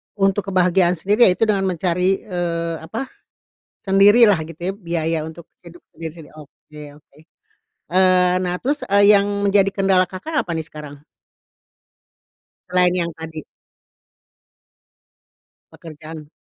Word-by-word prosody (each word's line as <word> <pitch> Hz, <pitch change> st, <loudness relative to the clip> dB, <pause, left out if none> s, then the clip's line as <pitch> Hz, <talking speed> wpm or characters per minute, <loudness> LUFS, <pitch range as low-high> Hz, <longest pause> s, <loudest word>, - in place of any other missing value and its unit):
untuk 195 Hz, 0 st, 0 dB
kebahagiaan 180 Hz, -1 st, +2 dB
sendiri 205 Hz, +8 st, +3 dB
ya 185 Hz, -, +5 dB
itu 225 Hz, -, -1 dB
dengan 200 Hz, -3 st, +1 dB
mencari, 180 Hz, +1 st, -1 dB
eee, 170 Hz, -3 st, -3 dB
apa, 170 Hz, +12 st, -6 dB, 0.8 s
sendirilah 205 Hz, +3 st, +5 dB
gitu 165 Hz, +1 st, -13 dB
ya -, -, -10 dB
biaya 170 Hz, -4 st, -3 dB
untuk 160 Hz, +1 st, -12 dB, 0.2 s
hidup 175 Hz, 0 st, -14 dB
sendiri 165 Hz, -1 st, -9 dB
oke 150 Hz, 0 st, -15 dB, 0.2 s
oke. 145 Hz, -1 st, -30 dB, 0.7 s
Eee, 185 Hz, 0 st, +3 dB
nah 180 Hz, -1 st, -2 dB
terus, 290 Hz, +3 st, -2 dB
eee, 200 Hz, +1 st, +4 dB
yang 200 Hz, -, -1 dB, 0.2 s
menjadi 195 Hz, 0 st, +3 dB
kendala 190 Hz, -2 st, +2 dB
Kakak, 295 Hz, -, -5 dB
apa -, -, -10 dB
nih 160 Hz, -1 st, -4 dB
sekarang? 145 Hz, -2 st, -11 dB, 1.7 s
Selain 180 Hz, -1 st, +2 dB
yang 170 Hz, -2 st, -2 dB
tadi? 160 Hz, -1 st, -8 dB, 2.3 s
Pekerjaan. 155 Hz, -1 st, -11 dB
180 Hz, 120 wpm, -20 LUFS, 165-195 Hz, 2.3 s, ya